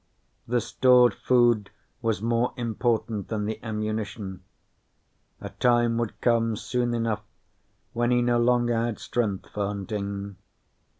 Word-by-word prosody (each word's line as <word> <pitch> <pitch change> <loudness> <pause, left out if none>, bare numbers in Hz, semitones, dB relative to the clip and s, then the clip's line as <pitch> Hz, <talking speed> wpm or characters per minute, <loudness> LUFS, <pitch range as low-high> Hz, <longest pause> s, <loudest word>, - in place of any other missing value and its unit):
The 120 0 +1
stored 125 +2 +4
food 120 -5 +2 0.3
was 110 -3 -1
more 115 +1 +1
important 115 -3 -1
than 105 -2 -2
the 110 +1 -4
ammunition. 105 -3 -4 1.0
A - - -7
time 120 -1 +2
would 115 -3 -3
come 115 -2 +2
soon 120 +2 -1
enough 115 -2 -1 0.7
when 120 +1 +1
he 120 0 +3
no 120 0 +2
longer 120 0 +3
had 115 -1 -1
strength 105 -6 -2
for 100 -1 -2
hunting. 100 -1 -4
115 Hz, 125 wpm, -26 LUFS, 105-120 Hz, 1.0 s, stored